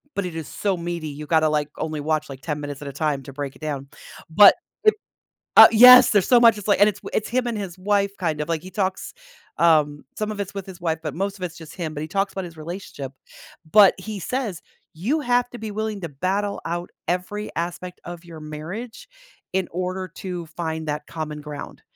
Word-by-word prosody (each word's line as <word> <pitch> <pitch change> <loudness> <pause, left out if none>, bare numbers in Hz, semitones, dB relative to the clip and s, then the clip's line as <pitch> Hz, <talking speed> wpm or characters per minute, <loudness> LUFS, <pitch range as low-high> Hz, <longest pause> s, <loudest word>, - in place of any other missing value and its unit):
but 200 -2 -1
it 170 -2 -6
is 160 -2 -5
so 200 -2 -1
meaty 170 -2 -4
you 150 +1 -7
gotta, 160 0 +3
like, 150 -1 0
only 155 -2 -3
watch, 155 0 -1
like, 135 -1 -9
10 150 -2 -3
minutes 145 -1 -6
at 140 - -6
a - - -6
time 140 -1 -1
to 140 - -9
break 140 -1 -5
it - - -19
down, 140 -3 -4 0.4
but 200 +5 +8 0.3
i 430 - +8 0.7
uh, - - +11
yes 250 +3 +9
there's 205 -4 +3
so 245 -2 +6
much 230 -3 +6
it's 210 - -8
like, 200 - +3
and 205 +1 +7
it's 205 0 -6
w - - -8
it's 210 - -1
him 245 0 0
and 230 -2 -2
his 190 -3 -6
wife 200 0 +1
kind 160 -4 -1
of 150 - -3
like, 160 -2 -1
he 185 - -9
talks, 190 -2 -2 0.4
um, 150 -3 +3
some 215 0 -2
of 205 - -7
it's 200 0 -4
with 195 -2 -5
his 185 -1 -10
wife, 160 -2 -1
but 155 -1 -4
most 200 +2 -2
of - - -7
it's 170 -2 -5
just 160 -3 -11
him, 165 -4 -4
but 145 - -4
he 155 - -4
talks 195 +1 -1
about 190 -2 -4
his 165 -2 -11
relationship. 155 -5 -7 0.6
But 205 -3 +7
he 215 -2 -6
says, 220 -3 -3 0.3
"You 245 - -1
have 245 -1 +1
to 245 - -8
be 220 -1 -5
willing 215 -1 -3
to 170 - -4
battle 195 +8 -2
out 175 +1 -4 0.2
every 185 +4 -2
aspect 175 +1 -4
of 175 0 -8
your 165 -2 -10
marriage 165 +10 -7 0.5
in 190 -1 0
order 185 +1 -3
to 180 -3 -5
find 160 -1 -4
that 150 0 -3
common 150 -2 -5
ground." 150 -1 -8
175 Hz, 230 wpm, -23 LUFS, 155-200 Hz, 0.7 s, uh